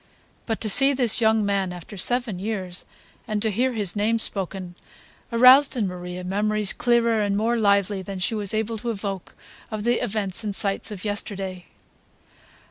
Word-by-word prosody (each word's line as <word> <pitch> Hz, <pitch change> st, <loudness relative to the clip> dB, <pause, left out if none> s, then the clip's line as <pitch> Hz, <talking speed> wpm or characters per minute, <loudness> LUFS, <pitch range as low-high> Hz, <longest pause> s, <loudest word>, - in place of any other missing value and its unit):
But 225 Hz, -2 st, -2 dB
to 220 Hz, -, -1 dB
see 270 Hz, +7 st, +6 dB
this 245 Hz, -3 st, +2 dB
young 220 Hz, -1 st, +3 dB
man 195 Hz, -2 st, -1 dB
after 180 Hz, +4 st, -10 dB
seven 235 Hz, 0 st, -1 dB
years, 190 Hz, -3 st, -5 dB, 0.4 s
and 215 Hz, -1 st, -2 dB
to 220 Hz, -, 0 dB
hear 250 Hz, +5 st, 0 dB
his 205 Hz, -5 st, -2 dB
name 215 Hz, +3 st, +1 dB
spoken, 190 Hz, -4 st, -4 dB, 0.6 s
aroused 255 Hz, +4 st, +6 dB
in 220 Hz, -, 0 dB
Maria 180 Hz, 0 st, -7 dB
memories 210 Hz, +2 st, 0 dB
clearer 235 Hz, -2 st, +1 dB
and 200 Hz, -1 st, 0 dB
more 230 Hz, +3 st, 0 dB
lively 200 Hz, -3 st, +1 dB
than 195 Hz, +1 st, -7 dB
she 185 Hz, +6 st, -2 dB
was 205 Hz, -3 st, -1 dB
able 220 Hz, 0 st, -2 dB
to 235 Hz, -, -4 dB
evoke 200 Hz, -4 st, -5 dB, 0.3 s
of 215 Hz, -1 st, -5 dB
the 240 Hz, +1 st, +1 dB
events 205 Hz, 0 st, -1 dB
and 205 Hz, -2 st, -2 dB
sights 200 Hz, +2 st, +4 dB
of 210 Hz, -1 st, -8 dB
yesterday. 195 Hz, -3 st, -4 dB
210 Hz, 170 wpm, -23 LUFS, 195-230 Hz, 0.6 s, see